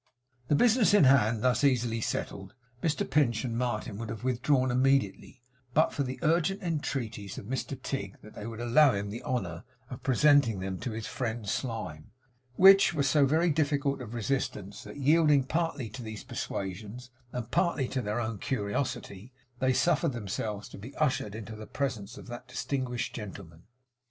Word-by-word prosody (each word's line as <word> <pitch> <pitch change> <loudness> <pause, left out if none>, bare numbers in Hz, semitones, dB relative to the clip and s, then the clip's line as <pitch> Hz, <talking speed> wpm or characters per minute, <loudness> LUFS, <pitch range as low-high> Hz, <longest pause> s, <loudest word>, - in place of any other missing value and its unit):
The 145 - +3
business 225 - +4
in 205 - +6
hand 115 -5 +4
thus 125 +2 +2
easily 120 -4 +2
settled, 95 -2 -4 0.3
Mr 160 -3 0
Pinch 130 -5 +2
and 115 -2 -3
Martin 110 -4 -2
would 115 -2 -5
have 115 0 -6
withdrawn 130 +1 +2
immediately, 130 -2 +1 0.3
but 155 - +4
for 145 - -2
the 130 -1 -3
urgent 170 +5 +2
entreaties 130 - -3
of - - -7
Mr 130 +2 -4
Tigg 115 -8 -4
that 110 - -13
they 105 - -7
would 115 -1 -7
allow 125 +4 +5
him 100 0 -3
the 115 - -6
honour 95 -9 -3 0.3
of 125 - -7
presenting 135 -5 +4
them 95 0 -4
to - - -4
his 110 -1 -5
friend 115 -3 -4
Slyme, 95 - -4 0.5
which 195 0 +7
were 145 - +1
so 140 +1 +4
very 160 +4 +3
difficult 145 -2 0
of 110 - -7
resistance 105 -4 -2
that, - - -9
yielding 150 0 +4
partly 155 -3 -1
to 125 +5 -8
these 110 -2 -7
persuasions 105 +6 -5 0.2
and 120 -2 -5
partly 170 -7 +1
to 130 - -1
their 105 +1 -2
own 110 -3 -3
curiosity, 120 -1 -3 0.3
they 130 0 +3
suffered 165 +2 +2
themselves 105 -1 -4
to - - -11
be 120 +8 -10
ushered 130 -8 0
into 110 0 -7
the 110 -1 -9
presence 120 -4 -3
of - - -10
that 120 +1 -8
distinguished 130 -1 -3
gentleman. 95 -6 -9
125 Hz, 170 wpm, -29 LUFS, 110-140 Hz, 0.5 s, which